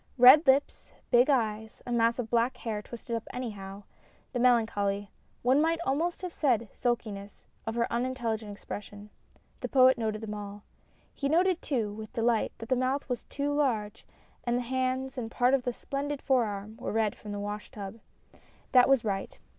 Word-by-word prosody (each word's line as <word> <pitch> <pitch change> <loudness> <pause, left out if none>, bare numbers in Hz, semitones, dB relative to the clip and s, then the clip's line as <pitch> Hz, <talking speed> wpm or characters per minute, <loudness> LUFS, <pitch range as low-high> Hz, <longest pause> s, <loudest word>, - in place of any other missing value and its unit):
Red 265 +5 +9
lips, 270 +2 +2 0.2
big 245 +2 +5
eyes, 220 -4 0
a 245 - -5
mass 230 -1 +3
of 245 -3 -3
black 240 +2 +2
hair 220 -4 -3
twisted 235 +1 -6
up 225 - -5
anyhow, 205 -5 -6 0.5
the 245 - -1
melancholy 205 -5 +2 0.3
one 260 +4 +4
might 330 +1 +2
almost 335 +7 -1
have 360 -2 -4
said 235 -7 +1
sulkiness 215 -5 -3 0.2
of 225 - -2
her 235 0 +2
unin 255 +2 -1
telligent 220 -4 -3
expression, 205 0 -8 0.5
the - - -4
Poet 260 -2 +6
noted 215 -1 -2
them 215 -1 -5
all. 205 0 -7 0.5
He 280 - -2
noted 355 +3 +3
too, 225 -7 -1
with 215 0 -9
delight, 230 -1 +1
that 225 - -9
the 260 - +3
mouth 255 +3 0
was 245 - -3
too 285 0 -2
large 235 -8 -1 0.4
and 240 0 +1
the 250 - -1
hands 260 +1 -1
and 225 -2 -4
part 245 +2 +2
of 270 -2 +2
the 245 - +1
splendid 280 +3 -4
fore 260 -4 +3
arm 205 +1 -6
were 245 - -4
red 220 -1 +1
from 210 - -9
the 205 - -4
wash 205 +1 -5
tub. 205 +1 -8 0.7
That 250 0 +6
was 270 -4 +4
right. 195 -2 -3
235 Hz, 185 wpm, -29 LUFS, 210-260 Hz, 0.7 s, Red